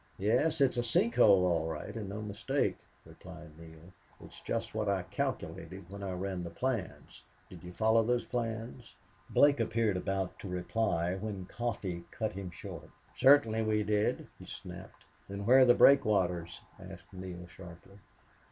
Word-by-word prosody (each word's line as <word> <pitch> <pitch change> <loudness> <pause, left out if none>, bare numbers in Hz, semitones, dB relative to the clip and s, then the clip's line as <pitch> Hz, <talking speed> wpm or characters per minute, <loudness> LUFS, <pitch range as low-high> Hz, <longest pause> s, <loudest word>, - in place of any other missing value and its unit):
"Yes, 125 +10 +1
it's 130 -3 +3
a 120 - +1
sink 115 0 +2
hole, 100 -6 +6
all 85 -3 +1
right, 80 +7 -6
and 105 -4 -5
no 105 +2 -5
mistake," 105 -1 -1 0.3
replied 85 -3 -12
Neale. 80 +2 -14 0.3
"It's - - -13
just 115 0 -3
what 110 -1 -1
I 95 -2 0
calculated 95 0 -5
when 100 0 -8
I 95 -2 -4
ran 95 0 -4
the 85 - -5
plans.... 110 - -4 0.3
Did 90 -3 -11
you 90 - -8
follow 110 +4 +3
those 120 +2 0
plans?" 115 -1 -5 0.3
Blake 145 -2 +4
appeared 115 -3 +1
about 95 0 -3
to - - -7
reply 90 -1 -1
when 95 -1 -5
Coffee 100 -6 -4
cut 110 -2 -3
him 95 -1 -6
short 85 - -9 0.3
"Certainly 130 -5 +5
we 110 -1 +1
did," 105 0 0
he - - -11
snapped. - - -10 0.2
"Then 100 +1 -5
where 130 +4 +7
are 130 - +8
the 120 - +6
breakwaters?" 90 -10 +3 0.2
asked - - -12
Neale, 90 -1 -8
sharply. 85 +2 -13
100 Hz, 160 wpm, -31 LUFS, 90-115 Hz, 0.3 s, are